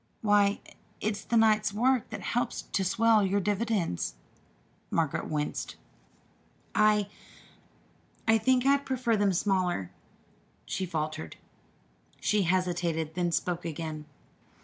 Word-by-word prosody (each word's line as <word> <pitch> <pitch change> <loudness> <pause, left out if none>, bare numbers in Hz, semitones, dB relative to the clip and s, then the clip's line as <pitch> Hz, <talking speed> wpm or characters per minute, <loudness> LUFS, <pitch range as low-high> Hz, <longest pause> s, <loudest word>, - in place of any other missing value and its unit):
Why, 205 -1 +3 0.4
it's 210 -1 -2
the 235 - +1
night 215 -1 +4
work 245 +2 +2
that - - -6
helps 240 0 -1
to 195 - -1
swell 225 +2 +3
your 195 +1 +1
dividends." 205 - -1 0.7
Margaret 160 -1 -1
winced. 150 -1 -3 1.0
"I 215 -2 +3 1.2
I 225 0 +5
think 255 +3 +2
I'd 280 0 +4
prefer 255 -4 0
them 205 -1 +2
smaller," 180 - 0 0.7
she 190 - -3
faltered. 155 -1 -4 0.8
She 210 -1 +2
hesitated, 175 -3 0
then 175 0 0
spoke 175 +1 -1
again. 155 -2 -5
200 Hz, 110 wpm, -29 LUFS, 170-220 Hz, 1.2 s, I